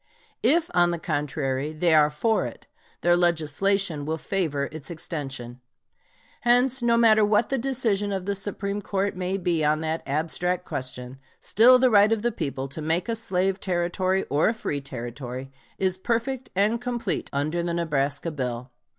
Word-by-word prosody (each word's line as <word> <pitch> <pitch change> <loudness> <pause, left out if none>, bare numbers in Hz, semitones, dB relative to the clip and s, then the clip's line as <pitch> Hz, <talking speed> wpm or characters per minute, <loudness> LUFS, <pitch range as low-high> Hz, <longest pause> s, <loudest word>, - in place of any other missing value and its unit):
If, 335 +3 +2
on 175 -1 +4
the 170 - -1
contrary, 145 -2 -2
they 165 +1 +2
are 150 -1 +6
for 215 +10 +1
it, - - -11 0.4
their 175 0 +4
legislation 175 0 +1
will 160 +2 -2
favor 155 -5 -1
its 155 +1 -8
extension. 135 -7 -6 0.8
Hence, 245 +2 +3
no 235 -1 +3
matter 220 -2 +5
what 210 +1 +2
the 270 - 0
decision 230 -6 0
of 190 -2 -3
the 200 - 0
Supreme 200 +1 -3
Court 195 0 -1
may 185 +1 -2
be 175 -4 0
on 150 +1 +2
that 160 +1 -2
abstract 165 +5 -1
question, 130 0 -5 0.2
still 245 +4 +6
the 255 0 +3
right 205 0 +6
of 225 -1 0
the 240 - +1
people 140 - -4
to 155 - -6
make 165 +3 0
a 230 - -1
slave 190 -3 -1
Territory 185 +1 0
or 145 +7 +2
a 230 - -1
free 145 -9 -3
Territory 130 +1 -7 0.3
is 185 -1 0
perfect 240 +5 -2
and 215 +5 +2
complete 240 -5 -2
under 155 +5 -1
the 170 0 -2
Nebraska 145 -1 -1
bill. 125 -3 -4
175 Hz, 170 wpm, -25 LUFS, 150-210 Hz, 0.8 s, are